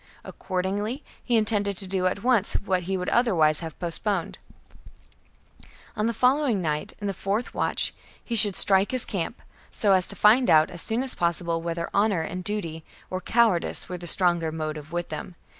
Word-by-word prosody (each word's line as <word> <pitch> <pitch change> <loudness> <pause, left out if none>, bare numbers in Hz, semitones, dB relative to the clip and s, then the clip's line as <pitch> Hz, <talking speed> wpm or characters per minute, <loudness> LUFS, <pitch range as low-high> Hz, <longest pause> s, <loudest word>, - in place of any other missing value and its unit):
Accordingly 205 +8 -3 0.2
he 240 -2 +2
intended 205 -3 +1
to 195 - -4
do 185 -1 0
at 195 +2 -3
once 235 -5 +2
what 185 -2 0
he 190 - 0
would 180 0 -3
otherwise 165 -11 +3
have 165 -2 -7
postponed: 175 +1 -2 1.6
on 215 0 0
the - - +1
following 255 -3 +2
night, 150 -3 -2
in 205 - -6
the 200 - -1
fourth 200 +6 -2
watch, - - 0 0.3
he 235 - -2
should 205 -3 +4
strike 195 0 +4
his 255 -2 +1
camp, 195 +4 -4 0.3
so 205 - +1
as 185 -2 +3
to - - -6
find 235 +5 +5
out 155 +2 +5
as 175 -2 -4
soon 230 +3 -1
as 265 - -3
possible 170 -1 -1
whether 170 0 -3
honour 200 -4 +2
and 180 +3 -5
duty 170 -6 -4 0.3
or 185 0 -3
cowardice 225 -7 +1
were 180 - -5
the 175 - -7
stronger 175 -2 +2
motive 155 -1 -5
with 175 0 -3
them. 155 +3 -7
190 Hz, 180 wpm, -25 LUFS, 170-215 Hz, 1.6 s, find